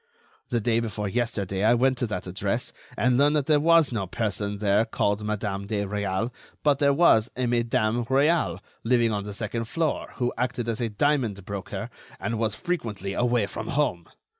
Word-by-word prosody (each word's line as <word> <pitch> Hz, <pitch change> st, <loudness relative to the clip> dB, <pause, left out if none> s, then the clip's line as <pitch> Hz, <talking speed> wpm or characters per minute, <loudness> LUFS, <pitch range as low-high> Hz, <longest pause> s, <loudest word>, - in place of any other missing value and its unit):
The 120 Hz, -, +1 dB
day 115 Hz, +1 st, +1 dB
before 105 Hz, -3 st, -3 dB
yesterday 100 Hz, -3 st, -1 dB
I 115 Hz, +3 st, +5 dB
went 130 Hz, +2 st, +3 dB
to 120 Hz, -, 0 dB
that 90 Hz, -4 st, -4 dB
address, 90 Hz, +1 st, -2 dB, 0.2 s
and 125 Hz, +3 st, +3 dB
learned 145 Hz, +2 st, +4 dB
that 145 Hz, -3 st, +2 dB
there 150 Hz, -1 st, +4 dB
was 165 Hz, -1 st, +5 dB
no 105 Hz, -5 st, -2 dB
person 100 Hz, 0 st, -2 dB
there 100 Hz, +1 st, +3 dB
called 105 Hz, -2 st, -1 dB
Madame 100 Hz, -2 st, -3 dB
de 105 Hz, -1 st, -1 dB
Réal, 100 Hz, +3 st, -2 dB, 0.3 s
but 145 Hz, -2 st, +3 dB
there 140 Hz, -1 st, +4 dB
was 140 Hz, -8 st, +4 dB
a 130 Hz, -, 0 dB
Madame 120 Hz, -1 st, +1 dB
Réal, 145 Hz, +7 st, +2 dB, 0.2 s
living 115 Hz, -1 st, +3 dB
on 100 Hz, -1 st, -2 dB
the 105 Hz, -, -6 dB
second 115 Hz, +2 st, -3 dB
floor, 160 Hz, +5 st, -2 dB
who 125 Hz, -1 st, -1 dB
acted 125 Hz, -1 st, -1 dB
as 115 Hz, +1 st, -2 dB
a 115 Hz, -, 0 dB
diamond 110 Hz, -4 st, 0 dB
broker 100 Hz, -1 st, -5 dB, 0.3 s
and 115 Hz, -1 st, -2 dB
was 110 Hz, -2 st, 0 dB
frequently 110 Hz, -, -3 dB
away 120 Hz, -2 st, +2 dB
from 100 Hz, -, -6 dB
home. 130 Hz, -, 0 dB
115 Hz, 185 wpm, -26 LUFS, 100-125 Hz, 0.3 s, I